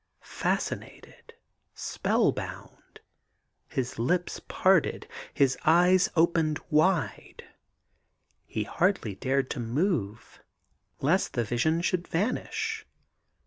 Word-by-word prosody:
Fascinated, - - -4 0.4
spell - - +1
bound, - - -9 0.7
his 130 -2 -3
lips 175 +9 0
parted, 185 -3 +2 0.2
his 135 -3 +2
eyes 180 +3 +5
opened 165 -2 +2
wide, 160 0 +1 1.0
he 110 - -2
hardly 165 - 0
dared 130 +5 -1
to 140 - -3
move 115 - -2 0.6
lest 175 +7 +1
the 120 - 0
vision 120 +9 0
should 175 0 -1
vanish. 440 - -2
160 Hz, 90 wpm, -28 LUFS, 130-180 Hz, 1.0 s, eyes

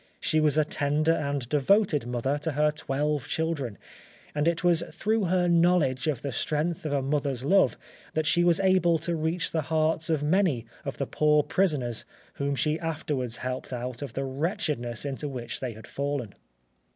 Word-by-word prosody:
She 155 - +1
was 155 -1 +2
a 155 - +4
tender 150 +2 +1
and 140 -5 -1
devoted 150 - +2
mother 125 +4 -1
to 155 +1 -2
her 150 +1 +3
twelve 150 -2 -2
children, 150 -9 -2 0.6
and 150 +2 0
it 170 0 +1
was 175 -2 +4
through 220 -1 0
her 180 0 +2
knowledge 170 -6 +3
of 145 -4 -1
the 140 - -2
strength 155 +5 -1
of - - -3
a 140 -2 +1
mother's 140 -2 -1
love 190 +7 +3 0.4
that 155 0 +1
she 175 +2 +3
was 175 0 +4
able 185 -3 +4
to 170 +2 -2
reach 160 +2 -1
the 160 - 0
hearts 160 +1 0
of 155 -3 +1
many 155 - +2 0.2
of 140 - -4
the 140 - -1
poor 150 +2 +3
prisoners 140 - +1 0.4
whom 140 0 0
she 155 +3 0
afterwards 150 -7 -3
helped 130 +1 -4
out 125 0 -4
of 140 - -5
the 135 - -2
wretchedness 140 - -2
into 140 +1 -3
which 120 -3 -4
they 125 -3 -4
had 110 +1 -12
fallen. 140 -6 -3
150 Hz, 180 wpm, -27 LUFS, 135-165 Hz, 0.6 s, a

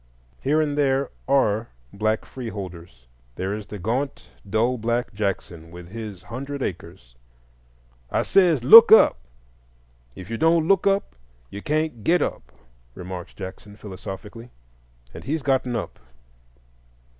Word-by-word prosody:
Here 150 +3 +2
and 145 -2 -1
there 135 -2 +1 0.2
are 115 -5 +2 0.2
black 110 +2 -1
free 125 -3 -7
holders: 85 - -9 0.3
there 95 +2 -3
is 105 -1 -6
the 105 - -7
gaunt 120 +9 -3 0.2
dull 115 +4 +1
black 120 +2 -1
Jackson, 95 -5 -4
with 85 0 -11
his 105 -3 -8
hundred 135 +4 -6
acres. 85 -8 -7 1.0
"I - - 0
says, 170 -9 +3
'Look 230 - +10
up! 220 - +7 1.0
If 95 - -10
you 115 - -3
don't 165 0 +3
look 195 +1 +3
up 195 - 0 0.4
you 100 - -7
can't 150 -6 -2
get 170 +5 +3
up,'" 65 - -5 0.4
remarks 90 0 -8
Jackson, 100 +2 -9
philosophically. 105 +3 -9 0.6
And - - -9
he's 155 +1 -2
gotten 130 -3 0
up. 115 - -5
115 Hz, 135 wpm, -23 LUFS, 95-140 Hz, 1.0 s, Look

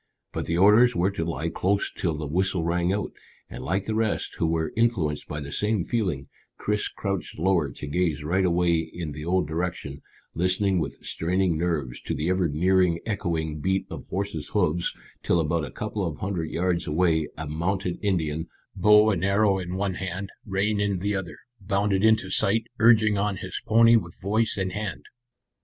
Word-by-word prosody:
But - - -3
the 85 - 0
orders 110 +6 +6
were 90 +3 +2
to 90 -4 -3
lie 85 0 -2
close 100 +4 0
till 80 -4 -1
the 75 - -4
whistle 90 +3 0
rang 85 +1 +1
out, 105 +1 -2 0.4
and - - -7
like 95 +6 -1
the 110 - -2
rest, 110 -1 -1
who 80 - +2
were 80 -1 -1
influenced 95 -11 0
by 75 - -4
the 70 -1 -7
same 105 +3 0
feeling, 90 - -1 0.3
Chris 105 0 -1
crouched 100 -3 -4
lower 85 -3 +2
to - - -7
gaze 80 0 -1
right 90 +5 +1
away 85 -2 +2
in 85 -3 -5
the 75 +1 -7
old 90 -1 +1
direction, 80 -3 -4 0.3
listening 95 +2 +1
with 75 - -3
straining 90 +1 0
nerves 80 -7 -2
to - - -3
the 80 +3 -1
ever 95 -2 +2
nearing 90 +2 +2
echoing 85 -8 -2
beat 95 +4 0
of - - -7
horses' 95 -6 -3
hoofs, 85 +3 +2 0.3
till 85 - +2
about 80 0 0
a - - -8
couple 100 - -4
of 80 -5 -3
hundred 90 -4 -3
yards 85 0 0
away 80 -1 +2
a 80 - -4
mounted 90 +4 -2
Indian, 80 -5 -1 0.3
bow 105 +3 +6
and 95 -4 -1
arrow 100 0 +3
in 90 0 -4
one 95 0 -1
hand, 95 +1 -5 0.2
rein 100 +1 0
in 100 -2 0
the 100 +3 -1
other, 95 -3 -4 0.2
bounded 100 0 0
into 110 -4 +3
sight, 110 +4 +3 0.2
urging 110 -3 +5
on 100 -1 0
his 95 -2 -5
pony 115 +1 +6
with 85 -6 -5
voice 110 +3 0
and 95 -1 -1
hand. 105 +1 -4
90 Hz, 185 wpm, -25 LUFS, 80-100 Hz, 0.4 s, orders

